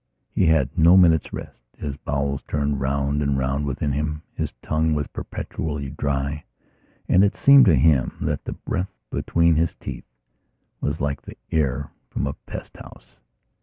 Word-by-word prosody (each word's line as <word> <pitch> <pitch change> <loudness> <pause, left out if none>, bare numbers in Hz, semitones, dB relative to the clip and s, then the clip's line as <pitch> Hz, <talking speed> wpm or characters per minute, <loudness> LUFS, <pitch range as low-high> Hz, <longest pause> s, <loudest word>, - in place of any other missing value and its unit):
He 90 - +3
had 80 -5 +2
no 85 +3 +6
minute's 85 -4 +4
rest; - - -8 0.2
his 70 -2 -4
bowels 70 -1 -2
turned 70 -2 -1
round 70 +2 0
and 70 -1 +1
round 70 +2 -1
within 70 +1 -1
him: 75 +2 -2
his - - -3
tongue 80 0 +1
was 75 -1 0
perpetually 75 -2 -5
dry 70 +1 -2 0.6
and 95 - +5
it 100 - +2
seemed 140 -1 +7
to 90 -7 +6
him 70 -1 +3
that - - -2
the - - -3
breath 90 +2 -3 0.2
between 85 -1 +2
his 85 +1 +1
teeth - - -8 0.7
was 75 +2 -2
like 70 -1 -1 0.3
air 75 -6 0 0.2
from - - -2
a - - -2
pest - - -10
house. - - -14
75 Hz, 160 wpm, -23 LUFS, 70-80 Hz, 0.7 s, seemed